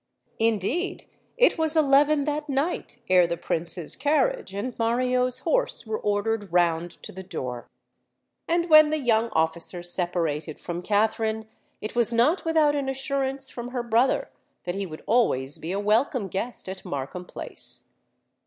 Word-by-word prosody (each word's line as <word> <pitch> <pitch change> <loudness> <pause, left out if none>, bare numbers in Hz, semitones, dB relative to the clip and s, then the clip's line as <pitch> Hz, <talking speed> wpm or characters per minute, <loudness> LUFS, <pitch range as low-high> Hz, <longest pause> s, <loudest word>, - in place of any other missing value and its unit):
Indeed, 225 - 0 0.3
it - - +4
was 320 0 +1
eleven 290 0 +4
that 300 +1 -2
night 280 +6 -1
ere 180 -2 +5
the 170 0 -2
Prince's 170 0 -2
carriage 310 - +1
and 205 +6 -4
Mario's 250 +2 +1
horse - - 0
were 220 0 -3
ordered 205 0 -1
round 170 -1 +2
to - - -7
the 190 - -8
door. 125 -9 -6 0.8
And 340 +1 +1
when 310 -2 +8
the 310 - +1
young 235 -4 +2
officer 165 +2 0
separated 170 -4 -2
from 175 0 -5
Katharine, 220 +2 0 0.3
it 215 - -5
was 235 -1 +3
not 240 +10 +3
without 315 -3 +3
an 275 -2 -1
assurance 270 0 -2
from 240 0 -6
her 245 -1 -3
brother 235 +3 +2 0.3
that 175 - -3
he 195 0 -3
would 155 -2 -10
always 145 - +1
be 165 - -5
a 195 - -1
welcome 215 +1 +1
guest 225 +5 -4
at 190 0 -6
Markham 140 +6 -5
Place. - - -5
225 Hz, 155 wpm, -26 LUFS, 180-275 Hz, 0.8 s, when